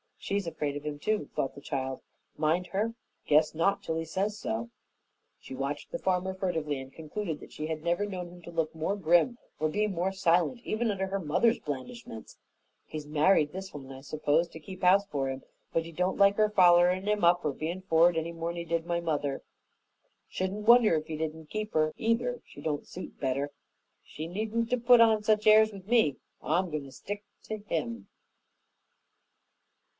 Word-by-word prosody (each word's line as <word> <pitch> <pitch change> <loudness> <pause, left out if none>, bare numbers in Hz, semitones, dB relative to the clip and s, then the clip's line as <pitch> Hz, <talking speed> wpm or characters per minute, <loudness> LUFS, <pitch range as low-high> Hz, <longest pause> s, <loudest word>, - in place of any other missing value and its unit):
"She's 200 -1 -2
afraid 150 -3 -2
of 145 +1 -6
'im 150 -1 -3
too," 210 0 -1
thought 135 - -1
the 140 - -10
child. 135 -2 -3 0.4
"Mind 165 +4 +1
her! 215 +5 -1 0.3
Guess 155 +1 +4
not, 195 +5 +1
unless 160 0 -1
he - - -5
says 195 +6 -2
so." 115 - -3 0.7
She - - -10
watched 140 +2 -4
the - - -3
farmer 185 0 0
furtively 165 -7 -2
and 135 0 -10
concluded 160 +1 -4
that - - -13
she 155 - -5
had 160 -1 -4
never 175 +4 +1
known 180 -3 -5
him 175 0 -13
to 170 - -9
look 165 -2 -1
more 165 +5 -1
grim 175 +6 +3 0.2
or 155 - +2
be 210 +7 +1
more 190 -1 -1
silent 190 +5 +2
even 225 0 -1
under 190 -2 -1
her 195 +1 -2
mother's 185 +8 +2
blandishments. 145 - -7 0.5
"He's 155 -1 -6
married 150 0 +3
this 190 +2 -7
one, 135 -2 -9
I 135 0 -9
s'pose, 155 +3 +1
to 160 - -10
keep 185 +4 -10
house 195 +3 +5
for 140 -8 -2
'im, 135 0 -5 0.3
but 165 0 +1
he 165 - -8
don't 180 +3 -1
like 200 0 +5
her 215 -1 +4
follerin' 180 0 +5
'im 210 -2 +1
up 175 +1 +5
or 150 - +2
bein' 165 +6 -4
for'ard 170 -2 +4
any 160 +1 -1
more'n 165 +1 -4
he 170 - -4
did 165 0 -1
mother. 160 -5 -1 0.8
Shouldn't 200 +3 -3
wonder 235 -6 +7
if 155 0 -2
he 160 -2 -4
didn't 160 0 -5
keep 215 0 -4
her, 155 0 +2
either, 235 +2 +1
if - - -16
she 145 - -13
don't 150 -1 -2
suit 185 - -9
better. 140 +1 -1 0.5
She 155 +2 -7
needn't 220 +6 -2
'a' - - +4
put 240 0 +7
on 220 -2 +5
such 215 0 +2
airs 215 0 +7
with 195 -2 -11
me, 220 - +3 0.2
for - - -12
I'm 175 +2 +1
goin' 150 -2 -3
to 135 - -11
stick 205 +9 -6 0.2
to 215 - -4
him." 145 - -4
170 Hz, 195 wpm, -29 LUFS, 155-200 Hz, 0.8 s, wonder